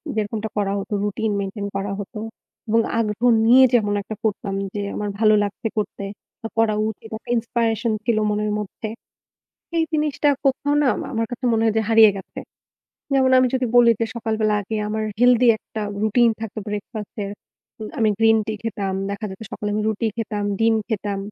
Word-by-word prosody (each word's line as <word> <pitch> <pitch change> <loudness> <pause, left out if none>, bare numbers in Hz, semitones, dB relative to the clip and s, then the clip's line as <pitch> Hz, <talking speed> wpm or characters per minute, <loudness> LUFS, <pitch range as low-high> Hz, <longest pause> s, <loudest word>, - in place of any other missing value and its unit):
যেরকমটা 215 +1 -2
করা 200 -1 0
হতো 200 +2 -5
routine 210 +1 -1
maintain 200 +1 -4
করা 195 0 -3
হতো। 210 +2 -6 0.5
এবং 225 +1 +4 0.2
আগ্রহ 215 +1 -2 0.2
নিয়ে 255 +3 +7
যেমন 205 -3 +3
একটা 215 +2 -7
করতাম 200 -2 -1 0.2
যে 205 - -3
আমার 210 -1 -2
ভালো 215 -1 +5
লাগছে 205 +2 -3
করতে 205 -1 -3 0.4
বা 225 - -4
করা 225 -1 +3 0.2
উচিত, 220 +1 -9
একটা - - -17
inspiration 230 -1 0
ছিল 230 -3 +2
মনের 210 0 0
মধ্যে। 210 +2 -6 0.9
এই 325 - +3
জিনিসটা 300 -1 +1 0.2
কোথাও 285 +2 +1
না - - +2 0.3
আমার 225 -1 0
কাছে 245 +2 -6
মনে 225 0 +2
হয় 220 -1 +2
যে - - +2
হারিয়ে 225 -2 +7
গেছে। 190 - -9 0.7
যেমন 260 -1 +4
আমি 255 - +4
যদি 255 -1 +1
বলি 235 -1 +7
যে 230 - +2
সকালবেলা 220 -2 0
আগে 220 +3 -4
আমার 220 0 -2 0.2
healthy 245 0 +5
একটা 220 - -8 0.2
routine 230 +2 +4
থাকত 225 -1 -6
breakfast 210 +1 -6
এর, 200 - -5 0.5
উম 215 - -4
আমি 220 -1 +3
green 225 0 +5
tea 220 - -2
খেতাম। 200 -4 -2 0.2
দেখা 200 +2 -4
যেত 190 - -10
সকালে 210 - -3
আমি 215 - 0
রুটি 220 +1 -1
খেতাম, 210 -2 -3
ডিম 225 0 +3
খেতাম। 205 -2 -2
220 Hz, 180 wpm, -22 LUFS, 210-230 Hz, 0.9 s, নিয়ে